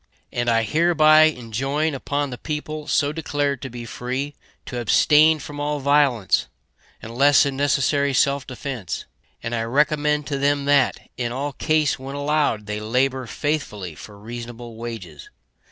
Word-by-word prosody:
And 120 Hz, 0 st, -1 dB
I 115 Hz, -1 st, +3 dB
hereby 155 Hz, +2 st, +5 dB
enjoin 135 Hz, +3 st, -1 dB
upon 140 Hz, +1 st, -2 dB
the 125 Hz, -, -6 dB
people 155 Hz, 0 st, -5 dB
so 145 Hz, 0 st, +2 dB
declared 145 Hz, -3 st, -2 dB
to 135 Hz, -, -5 dB
be 120 Hz, -1 st, -8 dB
free 130 Hz, +5 st, -4 dB, 0.3 s
to 125 Hz, -, -5 dB
abstain 150 Hz, +7 st, +5 dB
from 145 Hz, 0 st, -8 dB
all 145 Hz, 0 st, -1 dB
violence, 140 Hz, -7 st, +2 dB, 0.6 s
unless 135 Hz, +6 st, +4 dB
in 140 Hz, -1 st, -2 dB
necessary 140 Hz, 0 st, +1 dB
self 140 Hz, +1 st, +1 dB
defence; 130 Hz, -, -5 dB, 0.4 s
and 115 Hz, -, -3 dB
I 115 Hz, -, 0 dB
recommend 150 Hz, +4 st, +1 dB
to 140 Hz, -1 st, -3 dB
them 140 Hz, 0 st, +1 dB
that, 140 Hz, -2 st, +3 dB, 0.2 s
in 120 Hz, -1 st, -2 dB
all 140 Hz, +3 st, -3 dB
case 155 Hz, -3 st, +1 dB
when 135 Hz, +1 st, -7 dB
allowed, 145 Hz, -7 st, 0 dB
they 105 Hz, 0 st, -4 dB
labor 125 Hz, +3 st, 0 dB
faithfully 115 Hz, -, -3 dB
for 100 Hz, +7 st, -12 dB
reasonable 120 Hz, +2 st, -8 dB
wages. 110 Hz, -10 st, -8 dB
140 Hz, 150 wpm, -22 LUFS, 120-145 Hz, 0.6 s, hereby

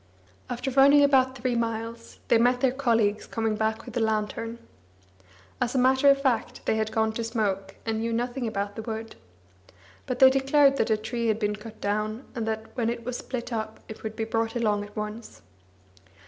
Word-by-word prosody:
After 245 Hz, +2 st, -3 dB
running 280 Hz, +2 st, +6 dB
about 265 Hz, -2 st, +3 dB
three 250 Hz, 0 st, -1 dB
miles, 230 Hz, 0 st, -3 dB
they 230 Hz, -, +4 dB
met 245 Hz, +1 st, +3 dB
their 265 Hz, -2 st, +3 dB
colleagues 230 Hz, -6 st, +1 dB
coming 225 Hz, -1 st, -1 dB
back 220 Hz, +1 st, -1 dB
with 245 Hz, -1 st, -10 dB
a -, -, +1 dB
lantern. 220 Hz, +1 st, -1 dB, 1.0 s
As 240 Hz, -, 0 dB
a -, -, +3 dB
matter 260 Hz, +2 st, +5 dB
of 275 Hz, 0 st, +5 dB
fact, 260 Hz, -5 st, -1 dB
they -, -, +2 dB
had 220 Hz, 0 st, -1 dB
gone 220 Hz, 0 st, +1 dB
to 230 Hz, -, -3 dB
smoke, 200 Hz, -4 st, -2 dB
and 220 Hz, -1 st, -1 dB
knew 230 Hz, +1 st, -1 dB
nothing 245 Hz, +2 st, -2 dB
about 205 Hz, -1 st, -3 dB
the 220 Hz, -, -5 dB
wood. 220 Hz, 0 st, -6 dB, 0.9 s
But 250 Hz, -, -2 dB
they 260 Hz, 0 st, +8 dB
declared 275 Hz, +1 st, +4 dB
that 225 Hz, -, +1 dB
a 220 Hz, -, +3 dB
tree 230 Hz, +2 st, -3 dB
had 220 Hz, -1 st, +2 dB
been 210 Hz, -1 st, -1 dB
cut 215 Hz, +1 st, -11 dB
down, 215 Hz, +4 st, -2 dB
and 230 Hz, -4 st, -3 dB
that, 220 Hz, 0 st, -4 dB
when 235 Hz, -3 st, 0 dB
it 235 Hz, -1 st, -4 dB
was 250 Hz, 0 st, -3 dB
split 245 Hz, -1 st, -5 dB
up, 220 Hz, -1 st, -4 dB
it 220 Hz, -, -9 dB
would 220 Hz, 0 st, -5 dB
be 225 Hz, -, -2 dB
brought 225 Hz, +1 st, -1 dB
along 210 Hz, -3 st, +1 dB
at 205 Hz, 0 st, -12 dB
once. 215 Hz, +2 st, -6 dB
230 Hz, 200 wpm, -26 LUFS, 220-250 Hz, 1.0 s, they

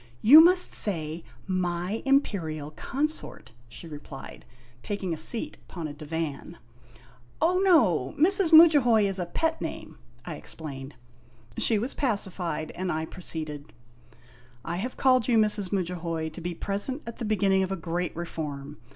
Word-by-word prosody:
"You 300 Hz, +8 st, +10 dB
must 360 Hz, +1 st, +3 dB
say, 165 Hz, -4 st, -2 dB, 0.2 s
'my 185 Hz, +2 st, -2 dB
Imperial 165 Hz, -, 0 dB
Consort,' 280 Hz, -, -4 dB
' 120 Hz, 0 st, -28 dB
she 120 Hz, -, -11 dB
replied, 145 Hz, -3 st, -10 dB, 0.4 s
taking 195 Hz, -1 st, -3 dB
a -, -, -2 dB
seat 160 Hz, +9 st, -4 dB
upon 170 Hz, -4 st, -5 dB
a 145 Hz, -, -7 dB
divan. 155 Hz, +1 st, -5 dB, 0.8 s
"Oh, 355 Hz, +3 st, +2 dB
no. 220 Hz, -, +3 dB
Mrs. 365 Hz, +1 st, +6 dB
Mudjahoy 290 Hz, -9 st, +7 dB
is 195 Hz, -1 st, +1 dB
a 175 Hz, -, -3 dB
pet 320 Hz, -, -1 dB
name," -, -, -7 dB, 0.3 s
I -, -, -6 dB
explained. 140 Hz, -3 st, -8 dB, 0.6 s
She 225 Hz, -, +2 dB
was 240 Hz, +6 st, -2 dB
pacified, 180 Hz, -, -2 dB
and 185 Hz, 0 st, -3 dB
I 160 Hz, 0 st, -2 dB
proceeded: 155 Hz, -4 st, -7 dB, 0.5 s
" 120 Hz, 0 st, -27 dB
I -, -, -3 dB
have 245 Hz, +7 st, -5 dB
called 255 Hz, -3 st, +3 dB
you, 240 Hz, -2 st, +3 dB
Mrs. 210 Hz, -3 st, +1 dB
Mudjahoy, 170 Hz, -4 st, -2 dB
to 165 Hz, +3 st, -10 dB
be 175 Hz, 0 st, -4 dB
present 205 Hz, -, -3 dB
at 235 Hz, -, -8 dB
the -, -, -4 dB
beginning 195 Hz, -2 st, +2 dB
of 190 Hz, 0 st, -2 dB
a 195 Hz, -, -2 dB
Great 170 Hz, +1 st, -3 dB
Reform. 150 Hz, -4 st, -6 dB
180 Hz, 150 wpm, -26 LUFS, 155-230 Hz, 0.8 s, You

